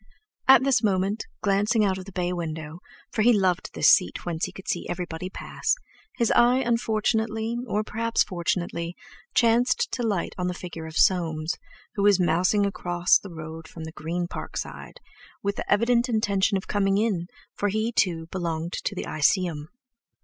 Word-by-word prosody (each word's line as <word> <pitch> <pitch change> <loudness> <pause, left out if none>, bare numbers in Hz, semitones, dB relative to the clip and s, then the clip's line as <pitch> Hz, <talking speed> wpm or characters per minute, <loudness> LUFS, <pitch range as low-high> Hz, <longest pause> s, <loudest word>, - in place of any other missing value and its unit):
At 265 -1 +8
this 270 -4 +3
moment, 200 0 0 0.2
glancing 205 +2 +2
out 190 -1 0
of 185 - -8
the 195 - -10
bay 180 -1 -1
window—for 160 +5 -6
he 240 +3 +6
loved 190 -5 +1
this - - +5
seat 90 - +2
whence 170 -1 -1
he - - -7
could 190 - -12
see 175 - -2
everybody 175 0 -4
pass—his 235 - -3
eye 245 +1 +5
unfortunately, 225 -2 0
or 215 -1 0
perhaps 230 +1 +1
fortunately, 170 -1 -2 0.4
chanced 235 +1 +3
to 250 - -3
light 210 -6 -1
on 180 - 0
the 180 - -2
figure 170 -3 -7
of 160 - -7
Soames, 165 -3 +2 0.4
who 200 - -2
was 200 -1 +5
mousing 180 +4 +3
across 175 -2 +2
the 200 - -10
road 160 -1 -8
from 160 0 -9
the 160 - -6
Green 170 +2 -3
Park - - -7
side, - - -7 0.4
with 200 0 -1
the - - -4
evident 235 +4 +3
intention 200 -3 +2
of 190 - -6
coming 195 -1 +1
in, 200 -6 0 0.3
for 205 - -1
he, 215 +3 0
too, 170 -8 +1
belonged 170 -2 -3
to - - -2
"The - - -4
Iseeum." 155 0 +1
190 Hz, 170 wpm, -25 LUFS, 170-220 Hz, 0.4 s, At